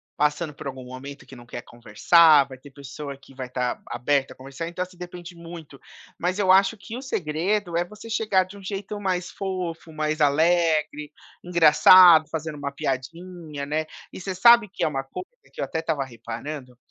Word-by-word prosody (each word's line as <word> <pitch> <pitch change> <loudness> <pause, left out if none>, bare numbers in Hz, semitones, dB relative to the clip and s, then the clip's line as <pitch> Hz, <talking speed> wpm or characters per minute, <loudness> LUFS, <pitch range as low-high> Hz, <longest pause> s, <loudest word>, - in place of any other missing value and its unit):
passando 150 +1 0
por 145 - -11
algum 130 -1 -7
momento 135 +3 -10
que 135 - -13
não 120 -1 -13
quer 115 - -7
conversar, 145 +6 +4
vai 130 -1 -11
ter 140 +2 -15
pessoa 140 0 -8
que 135 0 -19
vai 130 -1 -6
tá 125 -1 -3
aberta 135 +3 0
a - - -28
conversar, 135 +5 -7
então 180 +1 -3
você 185 0 -19
depende 175 0 -10
muito, 165 -4 -11 0.4
mas 180 +3 -2
eu 190 -2 +3
acho 195 +3 +4
que 220 +3 -9
o 250 - -6
segredo, 180 - -2
é 170 - +2
você 210 +5 -12
chegar 215 -4 +1
de 190 +2 -13
um 200 - -13
jeito 200 +1 -5
mais 185 -2 -2
fofo, 180 -4 -5
mais 155 0 -2
alegre, 155 0 +2 0.3
engraçado, 175 -1 +7
fazendo 155 -1 -5
uma 140 -1 -4
piadinha, 150 +2 -5
né 155 +2 -2 0.3
e - - -8
você 190 +1 -4
sabe 235 +3 +6
que - - -2
é - - +2
uma 135 -3 -3
coisa 135 - -8 0.2
que - - -16
eu - - 0
até 160 - -4
estava 160 -4 -2
reparando? 125 +2 -8
160 Hz, 190 wpm, -24 LUFS, 140-180 Hz, 0.4 s, engraçado